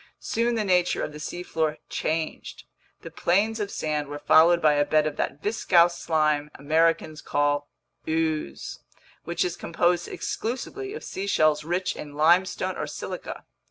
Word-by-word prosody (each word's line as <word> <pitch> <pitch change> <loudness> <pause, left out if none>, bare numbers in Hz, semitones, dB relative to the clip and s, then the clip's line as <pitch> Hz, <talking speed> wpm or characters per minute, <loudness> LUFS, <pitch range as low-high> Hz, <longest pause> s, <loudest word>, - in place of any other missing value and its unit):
Soon 235 +1 0
the 220 - 0
nature 180 -3 +2
of - - -3
the 150 - -9
seafloor 160 -2 -2
changed. 160 0 -3 0.4
The - - -8
plains 210 +6 +1
of 205 -1 -2
sand 150 -5 -2
were 145 +1 -6
followed 170 +3 +5
by 155 -2 +4
a 145 0 +3
bed 155 +1 +2
of 155 -1 -2
that 145 - -3
viscous 175 -5 +3
slime 155 -3 +1
Americans 160 +1 +1
call 145 0 0 0.4
"ooze," 160 - -2 0.5
which 170 +1 0
is 175 -1 -2
composed 175 +1 0
exclusively 390 - -4
of - - -7
seashells 155 -6 +1
rich 180 +3 -1
in 145 -1 -8
limestone 175 +5 +2
or - - -3
silica. - - -6
165 Hz, 150 wpm, -26 LUFS, 150-180 Hz, 0.5 s, followed